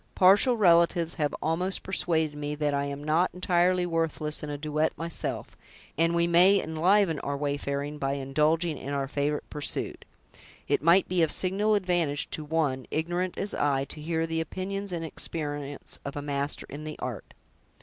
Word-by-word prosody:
"Partial 205 +7 +5
relatives 170 -3 +4
have 145 - 0
almost 180 +5 0
persuaded 160 -5 0
me 150 0 -3
that 150 -1 0
I 140 0 0
am 140 0 -5
not 160 +4 +2
entirely 180 0 +2
worthless 165 -3 -1
in 150 - -5
a 145 - -3
duet 155 +1 -1
myself; 165 0 -4 0.4
and 165 +1 +2
we 170 0 +3
may 180 +4 +5
enliven 165 +1 +2
our 140 0 -3
wayfaring 145 0 -3
by 135 -1 0
indulging 150 +4 0
in 140 +2 -5
our 140 -1 -1
favorite 145 +2 -2
pursuit. 150 -1 -3 0.6
It - - +1
might 170 +5 +5
be 180 -1 +1
of 160 -2 +3
signal 205 +3 +2
advantage 175 -7 0
to 155 - -2
one, 150 -4 -1
ignorant 175 +3 -2
as 200 - -3
I, 135 -2 +1
to 155 - -9
hear 160 +1 -1
the 165 0 -1
opinions 195 +4 -4
and 165 -2 -3
experience 145 -3 -5
of 140 - -6
a 145 - -3
master 140 0 -2
in 145 +2 -8
the 155 0 -6
art." 120 -6 -6
160 Hz, 170 wpm, -28 LUFS, 145-175 Hz, 0.6 s, Partial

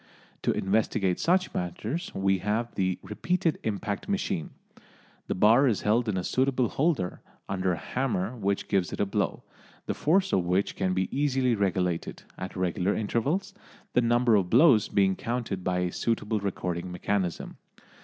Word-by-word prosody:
To - - +1
investigate 95 -2 0
such 180 +2 +2
matters 105 - -3
we 95 0 +2
have 110 +5 -1
the 95 -2 0
"repeated 165 +8 -1
impact" 100 - -3
machine. 190 - -1 0.8
The - - -1
bar 115 +8 +5
is 110 -7 +1
held 115 +2 +2
in 95 - -1
a 90 - -1
suitable 130 +2 +1
holder, 140 - 0 0.3
under 95 -1 0
a - - -3
hammer 120 - -2
which 100 -3 -1
gives 95 -3 +1
it - - -6
a - - +2
blow, 100 0 -2 0.4
the - - -1
force 190 +5 +2
of 90 - +3
which 90 +3 0
can 90 -1 0
be 95 0 +1
easily 135 -3 +2
regulated, 90 -4 -1
at 95 - -7
regular 90 +1 0
intervals, 140 - -1 0.4
the 125 - +4
number 120 0 +3
of 95 -4 +3
blows 130 - +6
being 95 -2 +3
counted 115 -5 -3
by 90 0 0
a 90 -1 -1
suitable 110 0 -1
recording 90 -2 -3
mechanism. 90 0 -2
105 Hz, 160 wpm, -27 LUFS, 95-125 Hz, 0.8 s, blows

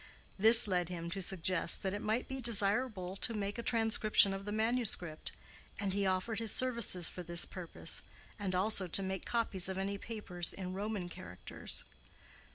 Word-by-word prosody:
This 225 +2 +9
led 180 -3 -1
him 170 -1 -6
to 195 - -4
suggest 185 -2 0
that 190 0 -2
it 205 - -5
might 220 +3 -2
be 265 0 -5
desirable 210 -3 +2
to 230 +3 -1
make 205 +2 -4
a - - -2
transcription 220 -3 +2
of 195 0 -7
the 205 - -5
manuscript, 220 -7 0 0.5
and 200 -2 -2
he 200 0 0
offered 190 +4 -1
his 225 -1 -3
services 235 -9 +1
for 180 - -7
this 170 0 +4
purpose, 180 -3 -2 0.4
and 190 -3 -3
also 195 0 +1
to 195 +3 +1
make 190 -1 -5
copies 210 -6 -1
of 190 - -5
any 200 +1 -3
papers 195 -7 -3
in 185 -1 -6
Roman 200 -1 -4
characters. 90 - -5
195 Hz, 170 wpm, -33 LUFS, 180-220 Hz, 0.5 s, This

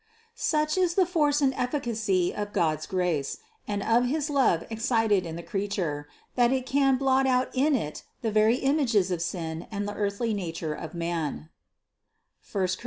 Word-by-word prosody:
Such 305 -5 0
is 350 -2 +2
the 380 - +4
force 300 -4 +2
and 270 -2 +3
efficacy 225 - 0
of 205 0 -4
God's 160 -5 0
grace, 180 -7 -1 0.3
and 205 -1 -2
of 235 +2 +3
his 295 +3 -1
love 260 - +3
excited 225 -5 +1
in 160 - -5
the 170 - -7
creature, 185 -8 -2 0.3
that 240 -1 +3
it 260 -1 0
can 270 0 +3
blot 265 0 +2
out 255 0 +2
in 280 +3 +3
it 155 - -3 0.2
the 225 - 0
very 215 +2 +4
images 255 - +2
of 175 -2 -1
sin 170 -1 -4
and 205 -1 -3
the 205 - -4
earthly 205 +2 -1
nature 165 -5 -3
of 160 +2 -7
man, 165 -2 -3 1.1
(I - - 0
Cor. 190 -1 +2
215 Hz, 175 wpm, -27 LUFS, 175-265 Hz, 1.1 s, the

